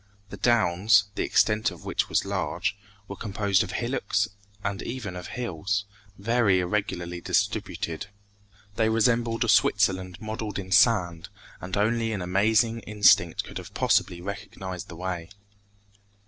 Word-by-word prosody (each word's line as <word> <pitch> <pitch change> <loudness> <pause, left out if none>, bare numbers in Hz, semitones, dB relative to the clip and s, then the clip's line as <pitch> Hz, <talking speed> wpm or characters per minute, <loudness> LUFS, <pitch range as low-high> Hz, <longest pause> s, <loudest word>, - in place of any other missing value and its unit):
The 100 - -7
downs, 100 -2 +3
the - - -3
extent 110 0 +2
of 90 -5 -12
which - - -1
was - - +1
large, - - -2 0.3
were 100 - -6
composed 100 -2 0
of 95 -3 -3
hillocks 120 -4 0 0.4
and 100 -1 -2
even 115 -6 -5
of 90 - -7
hills, 100 -3 -2 0.3
very 105 -2 +2
irregularly 90 -2 -2
distributed. 80 +1 -1 0.7
They 110 -1 +3
resembled 115 +1 +2
a - - -1
Switzerland 95 -4 +2
modeled 110 -1 -5
in 95 -1 -6
sand, 90 -4 +3 0.3
and 95 +2 -4
only 115 +2 +1
an 100 - -3
amazing 110 +5 +2
instinct 105 -6 +3
could - - -7
have - - -11
possibly 85 -1 +1
recognized 95 -1 -6
the 85 - -10
way. 90 -1 -4
100 Hz, 135 wpm, -26 LUFS, 90-110 Hz, 0.7 s, downs